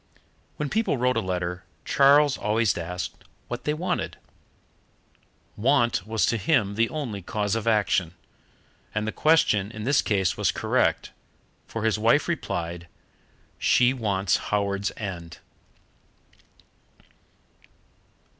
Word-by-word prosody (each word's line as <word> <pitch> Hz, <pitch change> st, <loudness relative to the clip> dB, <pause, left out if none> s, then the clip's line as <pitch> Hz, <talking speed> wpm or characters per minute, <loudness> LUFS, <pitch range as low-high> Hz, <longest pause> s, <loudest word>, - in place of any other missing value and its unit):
When 150 Hz, -, -2 dB
people 215 Hz, -3 st, 0 dB
wrote 125 Hz, +1 st, +1 dB
a -, -, +2 dB
letter 90 Hz, -2 st, -3 dB, 0.2 s
Charles 140 Hz, 0 st, +5 dB
always 110 Hz, -1 st, +1 dB
asked 90 Hz, +1 st, -5 dB, 0.3 s
what 120 Hz, 0 st, -5 dB
they 150 Hz, -, +1 dB
wanted. 180 Hz, +3 st, -3 dB, 1.4 s
Want 120 Hz, -5 st, +1 dB
was 110 Hz, 0 st, +1 dB
to 115 Hz, -, +1 dB
him 105 Hz, -, +1 dB
the 115 Hz, +2 st, +1 dB
only 125 Hz, -11 st, -4 dB
cause 105 Hz, +2 st, -2 dB
of 115 Hz, 0 st, -2 dB
action. 100 Hz, -6 st, +1 dB, 0.8 s
And 110 Hz, 0 st, -1 dB
the -, -, -1 dB
question 110 Hz, -12 st, +3 dB
in 105 Hz, -1 st, -8 dB
this 135 Hz, +4 st, +3 dB
case 95 Hz, -4 st, 0 dB
was -, -, +1 dB
correct, -, -, 0 dB, 0.6 s
for 115 Hz, -, -5 dB
his 110 Hz, -1 st, +1 dB
wife 115 Hz, +7 st, +3 dB
replied, 85 Hz, -, -3 dB, 0.7 s
"She 125 Hz, +1 st, +4 dB
wants 100 Hz, -7 st, 0 dB
Howards 100 Hz, -1 st, -1 dB
End." 85 Hz, -5 st, -6 dB
110 Hz, 115 wpm, -25 LUFS, 95-125 Hz, 1.4 s, Charles